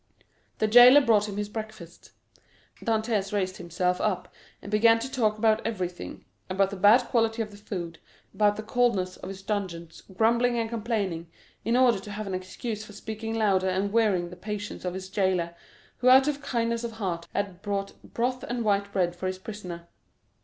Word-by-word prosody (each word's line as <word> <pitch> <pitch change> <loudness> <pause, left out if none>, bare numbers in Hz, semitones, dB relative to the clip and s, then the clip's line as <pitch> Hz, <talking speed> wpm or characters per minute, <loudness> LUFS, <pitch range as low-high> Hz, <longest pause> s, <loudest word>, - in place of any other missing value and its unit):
The - - +1
jailer 245 +5 +9
brought 215 -5 +3
him 200 - -6
his 205 0 -2
breakfast. 215 -5 -9 0.7
Dantès 220 -3 0
raised 190 -2 -1
himself 180 +1 -1
up 200 -4 -2 0.3
and 200 - -10
began 225 +2 +5
to 245 +4 -5
talk 215 -5 +1
about 220 0 +2
everything; 185 -5 -5 0.2
about 195 +1 +1
the - - -4
bad 210 +6 +6
quality 225 -1 +1
of 210 - -10
the 205 - -12
food, 175 -5 -6 0.3
about 205 -1 +3
the 215 - -6
coldness 215 -6 +1
of 185 - -8
his 195 0 -8
dungeon, 185 -5 -3 0.3
grumbling 235 +2 +3
and 230 -1 0
complaining, 205 -8 -2 0.3
in 230 +2 +1
order 245 -5 +4
to 205 - -9
have 215 +1 -5
an 195 - -4
excuse 210 +4 -5
for 215 - -12
speaking 220 +2 -5
louder, 195 -4 +2
and 195 +2 -1
wearying 195 -7 +2
the - - -8
patience 205 +1 -6
of 180 0 -2
his 190 0 -6
jailer, 185 -3 0 0.4
who 255 - +3
out 265 +2 +7
of 290 -1 -1
kindness 235 -2 -1
of 235 -1 -4
heart 180 -6 -4
had 195 -3 -3
brought 200 -1 -3
broth 250 +2 -2
and 240 -1 -3
white 200 -1 +1
bread 175 -3 0
for 185 +1 -4
his 185 0 -3
prisoner. 185 -4 -8
210 Hz, 185 wpm, -27 LUFS, 185-225 Hz, 0.7 s, jailer